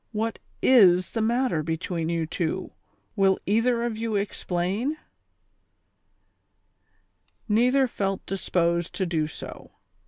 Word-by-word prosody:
"What 225 +1 -2 0.2
is 185 -8 +5
the 225 - -2
matter 235 -6 +1
between 165 +1 -3
you 165 -1 0
two, 160 0 -3 0.4
will 195 -2 +3
either 235 +3 +2
of 235 -2 -2
you 225 -1 -2
explain? 200 - -2 1.6
" - - -45
Neither 250 +5 +3
felt 195 -4 -3
disposed 170 -3 -1
to 190 - 0
do 160 -3 0
so. 155 - -10
195 Hz, 115 wpm, -25 LUFS, 170-230 Hz, 1.6 s, is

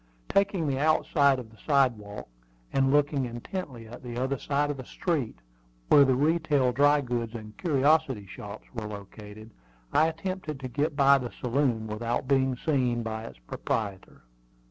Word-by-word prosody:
Taking 195 -4 +2
the 135 -2 0
outside 145 -2 +3
of 120 -3 -8
the 110 - -18
sidewalk, 120 -8 0 0.5
and 135 -1 +3
looking 145 -2 +2
intently 120 0 -6
at 120 +2 -10
the 120 -2 -7
other 130 +1 -1
side 145 +1 0
of 145 - -5
the 130 - -7
street, 145 - -2 0.5
where 145 - +8
the 130 -2 +3
retail 150 -2 +2
dry 145 +3 +4
goods 120 -3 -3
and 110 -2 -8
curiosity 145 - +2
shops 100 +2 -9
were 110 -3 -4
located, 105 +1 -10 0.4
I 160 - +5
attempted 165 -2 -4
to 130 - -4
get 145 +4 -1
by 140 -1 +6
the 125 -2 -4
saloon 125 -3 0
without 115 +4 -2
being 135 -2 +2
seen 125 -5 0
by 110 0 -4
its - - -10
proprietor. 95 - -4
130 Hz, 160 wpm, -28 LUFS, 115-145 Hz, 0.5 s, where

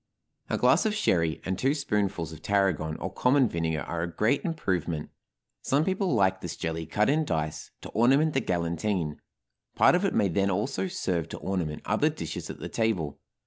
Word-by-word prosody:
A - - 0
glass - - +4
of 210 - -1
sherry 85 - +1
and 95 0 -2
two 135 +3 +2
spoonfuls 100 - -1
of 80 - -11
tarragon 95 -5 +1
or - - -5
common 130 0 +3
vinegar 80 -4 -1
are 85 +2 -3
a 85 0 -3
great 115 +10 +1
improvement. 90 - -2 0.5
Some 145 +4 +1
people 190 - 0
like 95 -2 +2
this 85 - -5
jelly 80 -1 -3
cut 105 +6 +1
in 155 +3 +3
dice, 75 - -3
to - - -8
ornament 135 +7 +3
the 135 - +2
galantine, 85 -3 -1 0.6
part - - +6
of 180 +2 +2
it 195 - +1
may 100 - +3
then 100 +3 +1
also 110 - -1
serve 90 - -2
to - - -6
ornament 85 -6 -3
other - - +2
dishes - - -6
at - - -6
the - - -6
table. 95 -10 -1
95 Hz, 185 wpm, -28 LUFS, 80-135 Hz, 0.6 s, part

